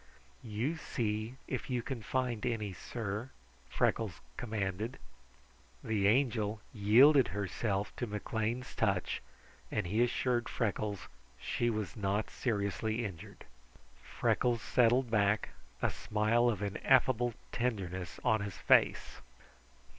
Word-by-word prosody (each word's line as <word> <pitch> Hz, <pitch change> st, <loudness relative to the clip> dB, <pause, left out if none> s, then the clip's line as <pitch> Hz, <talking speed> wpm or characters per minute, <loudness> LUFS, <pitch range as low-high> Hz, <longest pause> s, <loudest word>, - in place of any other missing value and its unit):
"You 120 Hz, +8 st, -2 dB
see 110 Hz, -5 st, -2 dB
if 130 Hz, -, -4 dB
you 125 Hz, -2 st, -1 dB
can 130 Hz, -2 st, -4 dB
find 125 Hz, -1 st, -1 dB
any, 110 Hz, -5 st, -1 dB
sir," 110 Hz, +4 st, -4 dB, 0.4 s
Freckles -, -, 0 dB, 0.2 s
commanded. 110 Hz, +1 st, -3 dB, 0.9 s
The 105 Hz, -3 st, +1 dB
Angel 110 Hz, -3 st, +2 dB
yielded 125 Hz, +6 st, +6 dB
herself 100 Hz, +1 st, -2 dB
to 120 Hz, -, -2 dB
McLean's 110 Hz, +4 st, -3 dB
touch, 95 Hz, -5 st, 0 dB, 0.5 s
and 105 Hz, -, -1 dB
he 105 Hz, +7 st, +1 dB
assured 120 Hz, 0 st, 0 dB
Freckles 105 Hz, -3 st, -1 dB
that -, -, -12 dB, 0.3 s
she 120 Hz, -, 0 dB
was 105 Hz, -6 st, -3 dB
not 100 Hz, 0 st, -1 dB
seriously 110 Hz, +1 st, -1 dB
injured. 95 Hz, -6 st, -8 dB, 0.6 s
Freckles 120 Hz, -2 st, 0 dB
settled 120 Hz, +2 st, +3 dB
back, 100 Hz, -1 st, +2 dB, 0.3 s
a -, -, +3 dB
smile 110 Hz, +3 st, +2 dB
of 105 Hz, -3 st, -2 dB
ineffable 120 Hz, +3 st, +2 dB, 0.2 s
tenderness 95 Hz, -7 st, -3 dB
on 110 Hz, -1 st, +3 dB
his 100 Hz, -3 st, -5 dB
face. -, -, +3 dB
110 Hz, 115 wpm, -33 LUFS, 100-120 Hz, 0.9 s, yielded